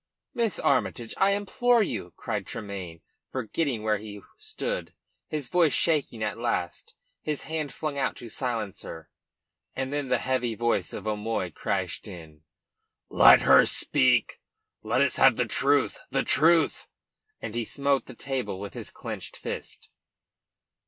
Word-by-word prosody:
"Miss 230 Hz, -6 st, 0 dB
Armytage 125 Hz, -3 st, 0 dB
I 195 Hz, +1 st, +4 dB
implore 235 Hz, +3 st, +2 dB
you!" 100 Hz, -, -4 dB
cried -, -, -3 dB
Tremayne, 95 Hz, -5 st, -6 dB, 0.3 s
forgetting 130 Hz, -1 st, -2 dB
where 110 Hz, -1 st, +1 dB
he 105 Hz, -1 st, -9 dB
stood, 435 Hz, +3 st, -5 dB, 0.3 s
his 150 Hz, -4 st, -4 dB
voice 165 Hz, -4 st, +3 dB
shaking 145 Hz, -9 st, +1 dB
at 105 Hz, +1 st, -2 dB
last, 115 Hz, -7 st, -3 dB, 0.3 s
his 150 Hz, -2 st, -3 dB
hand 155 Hz, -3 st, -3 dB
flung 150 Hz, -3 st, -4 dB
out 135 Hz, -, 0 dB
to 120 Hz, -, -9 dB
silence 115 Hz, -4 st, -3 dB
her. 80 Hz, -1 st, -9 dB, 0.6 s
And 130 Hz, +1 st, -3 dB
then 145 Hz, -2 st, -1 dB
the -, -, +2 dB
heavy 125 Hz, -3 st, -1 dB
voice 115 Hz, -5 st, 0 dB
of -, -, -6 dB
O'Moy 105 Hz, -3 st, -2 dB
crashed 95 Hz, +2 st, -3 dB
in: 80 Hz, -6 st, -11 dB, 0.7 s
"Let -, -, +8 dB
her -, -, +7 dB
speak. 65 Hz, -, +2 dB, 0.4 s
Let 115 Hz, +4 st, +1 dB
us 140 Hz, -, 0 dB
have 135 Hz, -3 st, +6 dB
the 125 Hz, -, +1 dB
truth 140 Hz, +4 st, +2 dB
the 135 Hz, -, +1 dB
truth!" 165 Hz, +1 st, +3 dB, 0.5 s
And 110 Hz, -, -6 dB
he 120 Hz, 0 st, -1 dB
smote 140 Hz, +3 st, 0 dB
the -, -, -10 dB
table 130 Hz, -7 st, -3 dB
with 100 Hz, 0 st, -7 dB
his -, -, -6 dB
clenched -, -, -7 dB
fist. -, -, -7 dB
125 Hz, 145 wpm, -27 LUFS, 105-145 Hz, 0.7 s, Let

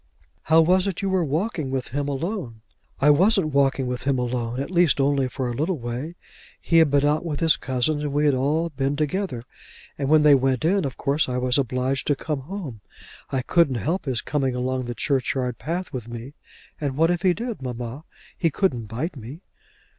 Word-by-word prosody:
How 160 Hz, +1 st, +6 dB
was 185 Hz, +4 st, +3 dB
it 195 Hz, 0 st, -3 dB
you 195 Hz, -, 0 dB
were 185 Hz, -2 st, +2 dB
walking 155 Hz, 0 st, -2 dB
with 130 Hz, -1 st, -3 dB
him 145 Hz, +3 st, -2 dB
alone?" 145 Hz, -, -4 dB, 0.4 s
"I 145 Hz, +2 st, +6 dB
wasn't 180 Hz, 0 st, +3 dB
walking 135 Hz, -1 st, +2 dB
with 125 Hz, 0 st, -3 dB
him 135 Hz, 0 st, +1 dB
alone; 120 Hz, 0 st, -2 dB
at 140 Hz, -, -4 dB
least 175 Hz, -5 st, +3 dB
only 135 Hz, -1 st, +2 dB
for 130 Hz, 0 st, -3 dB
a 120 Hz, -, -2 dB
little 160 Hz, +8 st, -1 dB
way. 125 Hz, +7 st, -5 dB, 0.4 s
He 165 Hz, -, +3 dB
had 160 Hz, -2 st, +5 dB
been 140 Hz, 0 st, +3 dB
out 150 Hz, +2 st, +2 dB
with 155 Hz, -4 st, -3 dB
his 165 Hz, -1 st, +4 dB
cousins 130 Hz, +4 st, -1 dB
and 145 Hz, -, -2 dB
we 145 Hz, +2 st, +1 dB
had 145 Hz, -, +4 dB
all 150 Hz, +6 st, +1 dB
been 140 Hz, 0 st, -1 dB
together, 150 Hz, -4 st, -2 dB, 0.6 s
and 135 Hz, -1 st, -1 dB
when 155 Hz, 0 st, +5 dB
they 150 Hz, -1 st, +7 dB
went 135 Hz, +1 st, +2 dB
in, 190 Hz, 0 st, +2 dB
of 135 Hz, -, -5 dB
course 140 Hz, 0 st, +1 dB
I 125 Hz, -, -1 dB
was 125 Hz, +1 st, +1 dB
obliged 130 Hz, +1 st, -1 dB
to 145 Hz, -, +3 dB
come 150 Hz, +1 st, -3 dB
home. 145 Hz, -, -7 dB, 0.5 s
I 130 Hz, -2 st, -1 dB
couldn't 165 Hz, -3 st, +3 dB
help 160 Hz, -, -2 dB
his 130 Hz, -4 st, -1 dB
coming 135 Hz, -4 st, -1 dB
along 130 Hz, 0 st, -1 dB
the 120 Hz, 0 st, -5 dB
churchyard 125 Hz, -2 st, -1 dB
path 175 Hz, +3 st, -4 dB
with 120 Hz, -3 st, -5 dB
me. 120 Hz, +4 st, -8 dB, 0.5 s
And 140 Hz, -3 st, -3 dB
what 165 Hz, +2 st, +4 dB
if 175 Hz, -1 st, -1 dB
he 185 Hz, -2 st, +3 dB
did, 235 Hz, -, -5 dB
mamma? 125 Hz, +2 st, -5 dB, 0.3 s
He 165 Hz, -, +1 dB
couldn't 140 Hz, -, 0 dB
bite 135 Hz, -, -4 dB
me." 130 Hz, +6 st, -9 dB
140 Hz, 205 wpm, -24 LUFS, 130-165 Hz, 0.6 s, they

